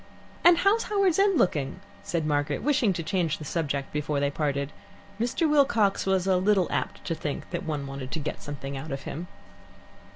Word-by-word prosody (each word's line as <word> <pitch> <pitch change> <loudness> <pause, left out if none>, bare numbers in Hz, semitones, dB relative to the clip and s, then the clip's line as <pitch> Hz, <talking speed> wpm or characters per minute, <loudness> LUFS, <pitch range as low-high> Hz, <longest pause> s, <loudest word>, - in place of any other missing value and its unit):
"And 345 -1 +8
how's 400 +6 +3
Howards 390 -4 +2
End 395 -3 +4
looking?" 145 - +1 0.2
said 165 -3 -2
Margaret, 145 -1 0
wishing 260 -7 +3
to 170 - -3
change 165 -2 0
the 155 - -8
subject 140 -4 -2
before 150 -1 -1
they 140 0 +1
parted. 140 -1 -1 0.5
Mr. 245 +8 +1
Wilcox 270 -11 +3
was 190 -1 +2
a 190 -1 +3
little 190 0 +3
apt 130 -3 -3
to 170 - -1
think 155 -2 -4
one 155 -4 -2
wanted 135 -1 -6
to 160 - -3
get 150 - -5
something 140 -1 -6
out 135 +3 -6
of 135 0 -4
him. 170 +5 -6
160 Hz, 185 wpm, -27 LUFS, 145-210 Hz, 0.5 s, And